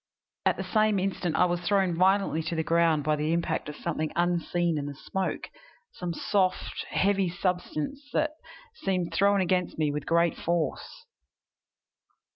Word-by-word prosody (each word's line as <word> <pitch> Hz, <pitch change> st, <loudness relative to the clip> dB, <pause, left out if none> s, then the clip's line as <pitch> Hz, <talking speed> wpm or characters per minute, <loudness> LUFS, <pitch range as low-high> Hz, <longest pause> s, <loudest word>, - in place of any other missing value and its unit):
At -, -, +2 dB
the -, -, -3 dB
same 215 Hz, -2 st, +2 dB
instant 185 Hz, -3 st, -1 dB
I 180 Hz, -, +5 dB
was 175 Hz, 0 st, -1 dB
thrown 190 Hz, 0 st, +2 dB
violently 190 Hz, -2 st, +3 dB
to 160 Hz, +2 st, -3 dB
the 160 Hz, -, 0 dB
ground 165 Hz, -2 st, +3 dB
by 155 Hz, +1 st, +2 dB
the 150 Hz, +2 st, 0 dB
impact 170 Hz, -3 st, -1 dB
of 150 Hz, -, -7 dB
something 155 Hz, -1 st, -2 dB
unseen 175 Hz, -1 st, +1 dB
in 145 Hz, -, -4 dB
the 145 Hz, -, -6 dB
smoke 190 Hz, +6 st, -3 dB, 0.4 s
some 180 Hz, -2 st, -4 dB
soft, 185 Hz, +2 st, 0 dB
heavy 195 Hz, -1 st, +2 dB
substance 180 Hz, -, -3 dB
that 305 Hz, -1 st, +1 dB, 0.4 s
seemed 185 Hz, -, -2 dB
thrown 200 Hz, +2 st, +3 dB
against 180 Hz, -1 st, 0 dB
me 155 Hz, -2 st, +1 dB
with 145 Hz, -1 st, -4 dB
great 170 Hz, 0 st, +3 dB
force. 170 Hz, -, -2 dB
175 Hz, 155 wpm, -28 LUFS, 160-190 Hz, 0.4 s, I